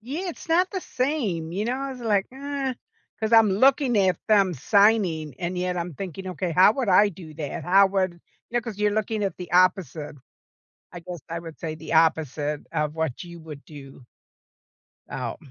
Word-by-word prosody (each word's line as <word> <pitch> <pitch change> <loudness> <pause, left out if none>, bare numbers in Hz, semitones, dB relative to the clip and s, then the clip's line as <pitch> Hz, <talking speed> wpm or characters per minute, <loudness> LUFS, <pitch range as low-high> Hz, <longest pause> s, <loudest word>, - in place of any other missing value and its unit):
Yeah, 295 - -5
it's 330 - -12
not 360 +3 +3
the 380 -2 -3
same, 235 - -2
you 200 +4 -2
know. 245 - 0
I 275 +1 -4
was 250 - -10
like, 210 -4 +1
"Uh," 275 -1 -3 0.5
'cause 220 0 -1
I'm 225 -2 +6
looking 260 +2 +3
at 185 -3 +3
them 200 -4 +4
signing, 180 - +2
and 180 +1 -3
yet 180 0 -1
I'm 175 -1 -3
thinking, 190 +2 -7
"Okay, 180 0 -3
how 185 +5 +6
would 250 -2 -2
I 205 +2 +5
do 165 -4 -12
that? 150 -2 -5
How 195 +2 +6
would" 190 -2 0 0.4
you 240 - -2
know, - - +3
'cause 225 -4 -7
you're 210 0 +2
looking 215 0 -1
at 195 - -3
the 180 -1 -9
opposite. 175 -5 +2 0.8
I 175 - -7
guess, 175 0 -8
I 165 0 -4
would 165 -2 -9
say 155 -2 -4
the 160 +1 -8
opposite 150 -2 +1
of 150 0 -1
what 160 -3 -2
you 170 -1 -10
would 150 -3 -10
do. 135 -4 -12 1.1
Oh. - - -4
185 Hz, 195 wpm, -25 LUFS, 165-220 Hz, 1.1 s, I'm